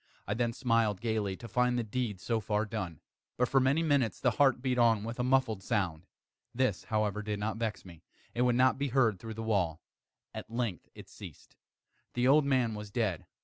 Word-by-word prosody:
I 100 - 0
then 120 +1 0
smiled 115 -5 +1
gaily, 105 -4 -1
to 115 - -9
find 125 +3 +1
the 120 - 0
deed 110 -3 -3
so 115 +3 -1
far 105 0 -1
done. 95 -8 -5 0.4
But, 125 - +2
for 135 - +4
many 135 +5 +2
minutes, 140 -7 +1
the 125 - +2
heart 135 +1 +3
beat 125 -1 0
on 115 -3 +4
with 115 +2 -5
a - - +1
muffled 130 -5 +2
sound. 90 -3 -2 0.5
This, 125 -7 0
however, 105 -1 0
did 105 0 -3
not 110 +2 -2
vex 110 -5 -3
me; 85 -3 -13 0.3
it 120 - -1
would 125 -1 +3
not 130 +1 +3
be 140 - 0
heard 120 -7 +2
through 110 -1 -7
the 115 - -5
wall. 90 -7 0 0.5
At - - -7
length 115 -7 -3
it - - -11
ceased. - - -12 0.6
The 125 +1 +2
old 145 +2 +5
man 130 -5 +2
was 105 -1 -7
dead. 100 -6 -2
115 Hz, 205 wpm, -31 LUFS, 105-125 Hz, 0.6 s, old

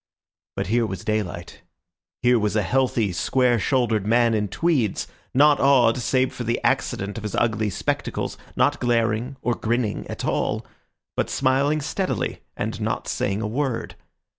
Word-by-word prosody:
But - - -2
here 115 +4 +1
was 95 -3 -6
daylight; 100 -5 -3 0.6
here 125 -1 +5
was 105 0 0
a 105 - +2
healthy, 120 -3 +1
square 125 +5 +2
shouldered 115 -4 +1
man 115 +1 +4
in 105 -1 0
tweeds, 135 - 0 0.3
not 145 +1 +5
odd 130 -4 +5
save 130 +2 +1
for 125 - -5
the 115 0 0
accident 100 +2 0
of 110 - -6
his 105 - -3
ugly 110 -2 +1
spectacles, - - -2 0.2
not - - +2
glaring 115 +1 0
or 120 - +1
grinning 115 -2 -1
at - - -5
all, - - -1 0.5
but - - 0
smiling 140 +3 +2
steadily 150 - -2 0.2
and - - -3
not - - -2
saying 100 +3 -1
a - - -1
word. 130 +1 -2
115 Hz, 155 wpm, -23 LUFS, 105-130 Hz, 0.6 s, here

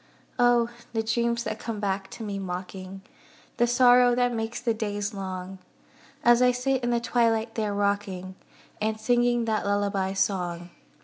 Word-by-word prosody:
Oh! 240 -1 +4 0.2
the 225 -1 0
dreams 235 +1 0
that 215 0 -4
come 225 -2 -5
back 195 -1 -2
to 230 - -8
me 200 -2 -4
mocking, 185 +1 -6 0.5
The 240 - +3
sorrow 245 0 +5
that 245 0 +1
makes 225 0 -3
the 230 - 0
days 205 -1 -3
long; 190 -1 -6 0.6
As 240 +1 +5
I 250 0 +5
sit 255 +1 -1
in 240 - 0
the 240 -1 +2
twilight 230 -1 +1
there 210 -3 -2
rocking, 200 -2 -1 0.5
And 220 0 -1
singing 240 +1 +2
that 220 -1 0
lullaby 200 -1 0
song. 180 -3 -1
220 Hz, 160 wpm, -26 LUFS, 195-240 Hz, 0.6 s, sorrow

